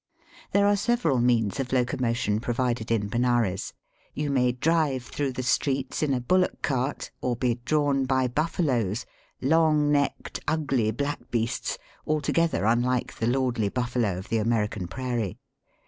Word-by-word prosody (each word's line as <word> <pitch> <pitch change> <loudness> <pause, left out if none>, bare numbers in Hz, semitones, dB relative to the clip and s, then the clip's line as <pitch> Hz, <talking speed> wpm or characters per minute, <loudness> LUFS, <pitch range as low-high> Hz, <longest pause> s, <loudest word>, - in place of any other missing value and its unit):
There 200 0 +4
are 205 0 +4
several 200 - +1
means 120 -3 +2
of 130 -2 -2
locomotion 125 -4 0
pro 120 +1 -2
vided 120 -3 -1
in 110 -3 +1
Benares. 120 -4 0 0.4
You 150 -1 -1
may 125 -2 +3
drive 145 0 +1
through 135 +1 -3
the 130 - -4
streets 135 +1 0
in 150 -2 +1
a 130 - +1
bullock 180 +9 +1
cart 135 0 -1
or 125 -1 0
be 120 0 0
drawn 145 -2 +2
by 130 -1 +2
buJBFaloes 125 - 0 0.2
— - - -39
long 150 0 +3
necked, 145 -1 0
ugly, 140 -8 +1
black 140 +6 -3
beasts, 115 -1 -1 0.3
altogether 155 - +1
unlike 120 +2 +1
the 115 - 0
lordly 120 -4 +1
buffalo 120 -5 -1
of 95 - -8
the 115 - +1
American 105 -4 0
prairie. 120 -3 -3
125 Hz, 150 wpm, -26 LUFS, 115-145 Hz, 0.4 s, There